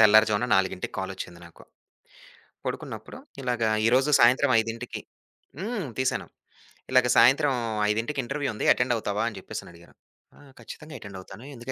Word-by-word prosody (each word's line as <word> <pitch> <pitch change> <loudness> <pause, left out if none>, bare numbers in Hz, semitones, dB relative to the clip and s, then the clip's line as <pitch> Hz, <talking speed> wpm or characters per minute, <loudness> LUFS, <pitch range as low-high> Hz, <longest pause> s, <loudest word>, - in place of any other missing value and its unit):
తెల్లారిజామున 110 +1 +5
4కి 95 -1 -1
కాలొచ్చింది 85 0 -6
నాకు. 85 - -17 1.0
పడుకున్నప్పుడు - - -6 0.2
ఇలాగ 120 -2 -1 0.2
ఈ - - +5
రోజు 135 +3 +2
సాయంత్రం 130 +3 +5
5కి 115 +2 -5 0.6
హ్మ్. 210 -4 -3
తీశాను. 130 0 0 0.7
ఇలాగ 130 -1 +5
సాయంత్రం 135 +4 +5 0.4
5కి 115 +7 -1
ఇంటర్వ్యూ 140 +2 -2
ఉంది - - -3
అటెండ్ 125 0 +1
అవుతావా? 105 -1 -2
అని 105 - -11
చెప్పేసని - - -8
అడిగారు. 85 +1 -18 0.4
ఆ! - - -19 0.2
ఖచ్చితంగా 155 0 -10
అటెండ్ 100 -2 -9
అవుతాను 95 +6 -12
ఎందుకు 120 +2 -7
120 Hz, 140 wpm, -26 LUFS, 105-130 Hz, 1.0 s, తెల్లారిజామున